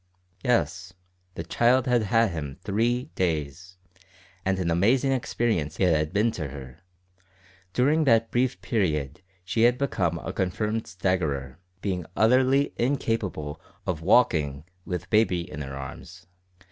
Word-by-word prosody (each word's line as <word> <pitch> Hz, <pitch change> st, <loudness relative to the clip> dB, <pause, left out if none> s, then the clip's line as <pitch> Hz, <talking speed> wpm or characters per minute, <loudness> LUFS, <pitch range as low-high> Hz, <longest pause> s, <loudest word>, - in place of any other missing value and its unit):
Yes; 95 Hz, -6 st, 0 dB, 0.4 s
the 85 Hz, -, -4 dB
child 120 Hz, +9 st, +3 dB
had 125 Hz, -3 st, +3 dB
had 115 Hz, 0 st, +2 dB
him 75 Hz, -5 st, -5 dB
three 120 Hz, +7 st, 0 dB
days, 85 Hz, +1 st, -2 dB, 0.7 s
and 95 Hz, 0 st, 0 dB
an 90 Hz, -3 st, -1 dB
amazing 120 Hz, +11 st, +3 dB
experience 115 Hz, -, -1 dB
it 90 Hz, -4 st, +4 dB
had 75 Hz, 0 st, 0 dB
been 110 Hz, +3 st, +2 dB
to 80 Hz, -9 st, -4 dB
her. 65 Hz, -2 st, -10 dB, 0.9 s
During 150 Hz, -, +2 dB
that 115 Hz, -3 st, +3 dB
brief 120 Hz, -6 st, +1 dB
period 80 Hz, -, -1 dB, 0.2 s
she 105 Hz, +5 st, -1 dB
had 120 Hz, +1 st, +5 dB
become 90 Hz, -11 st, 0 dB
a -, -, -6 dB
confirmed 105 Hz, +4 st, -1 dB
staggerer, 80 Hz, -7 st, -2 dB, 0.2 s
being 90 Hz, -4 st, -2 dB
utterly 130 Hz, +5 st, +3 dB
incapable 115 Hz, -, -1 dB, 0.2 s
of 85 Hz, -3 st, -2 dB
walking 80 Hz, -, +3 dB, 0.2 s
with 90 Hz, -4 st, -4 dB
baby 105 Hz, -5 st, +3 dB
in 75 Hz, -3 st, -7 dB
her 70 Hz, -1 st, -6 dB
arms. 65 Hz, -1 st, -9 dB
95 Hz, 135 wpm, -26 LUFS, 80-120 Hz, 0.9 s, had